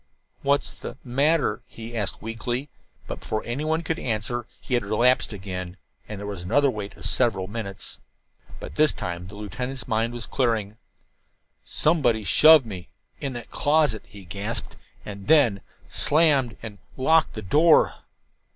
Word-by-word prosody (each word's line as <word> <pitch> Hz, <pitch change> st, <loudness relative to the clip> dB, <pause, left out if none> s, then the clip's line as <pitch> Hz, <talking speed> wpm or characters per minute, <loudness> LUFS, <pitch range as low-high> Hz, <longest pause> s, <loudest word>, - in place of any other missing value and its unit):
"What's 140 Hz, +1 st, +1 dB
the -, -, -8 dB
matter?" 140 Hz, -1 st, +1 dB
he 115 Hz, +1 st, -9 dB
asked 105 Hz, -4 st, -2 dB
weakly; 120 Hz, +5 st, -3 dB, 0.4 s
but -, -, -6 dB
before 110 Hz, -, -3 dB
anyone 155 Hz, +7 st, -1 dB
could 160 Hz, +1 st, -2 dB
answer 120 Hz, +1 st, -2 dB
he -, -, -6 dB
had 120 Hz, -, +2 dB
relapsed 120 Hz, +6 st, +2 dB
again, 90 Hz, -2 st, -6 dB, 0.3 s
and 105 Hz, -2 st, -6 dB
there 100 Hz, -, -6 dB
was 100 Hz, -3 st, -5 dB
another 130 Hz, +10 st, +3 dB
wait 105 Hz, -3 st, -7 dB
of -, -, -8 dB
several 105 Hz, -7 st, +1 dB
minutes. 100 Hz, -1 st, -6 dB, 0.6 s
But -, -, -8 dB
this 155 Hz, -1 st, +4 dB
time 90 Hz, 0 st, -5 dB
the 100 Hz, -, -11 dB
lieutenant's 125 Hz, +4 st, -5 dB
mind 115 Hz, +2 st, 0 dB
was 120 Hz, -1 st, -5 dB
clearing. 110 Hz, -5 st, -1 dB, 0.9 s
"Somebody 130 Hz, -9 st, +1 dB
shoved 155 Hz, +5 st, +7 dB
me 95 Hz, -5 st, -8 dB, 0.3 s
in 135 Hz, -2 st, -3 dB
that 120 Hz, -1 st, -8 dB
closet," 145 Hz, -7 st, +2 dB
he 100 Hz, -2 st, -13 dB
gasped, 100 Hz, +7 st, -4 dB, 0.3 s
"and 100 Hz, -1 st, -8 dB
then 135 Hz, -11 st, +4 dB, 0.3 s
slammed 145 Hz, -6 st, +3 dB
and 105 Hz, -3 st, -8 dB, 0.2 s
locked 160 Hz, +5 st, +3 dB
the 110 Hz, -, -5 dB
door." 155 Hz, -, +5 dB
115 Hz, 150 wpm, -25 LUFS, 105-140 Hz, 0.9 s, shoved